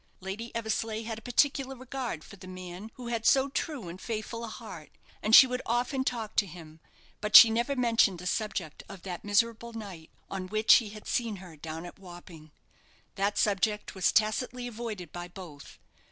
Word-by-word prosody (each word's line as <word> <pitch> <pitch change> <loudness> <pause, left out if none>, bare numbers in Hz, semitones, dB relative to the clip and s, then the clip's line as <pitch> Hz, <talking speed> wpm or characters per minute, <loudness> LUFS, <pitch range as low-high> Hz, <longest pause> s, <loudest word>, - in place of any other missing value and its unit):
Lady 200 +5 -6
Eversleigh 220 -1 -2
had 225 0 -5
a - - -20
particular 270 +2 +1
regard 255 - -5
for - - -12
the 185 -1 -13
man 185 +2 -8
who 245 -2 -7
had 230 -2 -2
so 270 +3 +4
true 275 - -3
and 175 +3 -9
faithful 230 +1 -4
a - - -4
heart, 215 -9 -9 0.3
and 215 +2 +5
she - - +11
would 250 0 -3
often 245 +3 0
talk 225 -4 -3
to 205 - +3
him; 160 -2 -12 0.4
but 210 0 -1
she 225 - +12
never 235 +5 0
mentioned 230 -6 +3
the 180 - -9
subject 180 -6 -3
of 190 -3 -10
that 180 -3 -6
miserable 230 +3 +1
night 195 -8 -8 0.2
on 190 -1 -5
which 215 +3 +6
he 225 -4 -3
had 210 0 -11
seen 230 -3 -1
her 180 -4 -11
down 160 +2 -7
at 175 - -11
Wapping. 175 -4 -12 0.6
That 200 +1 -1
subject 210 +1 +1
was 190 -2 +2
tacitly 245 +3 0
avoided 220 -7 -6
by 175 0 -6
both. 175 -6 -11
215 Hz, 185 wpm, -29 LUFS, 185-235 Hz, 0.6 s, she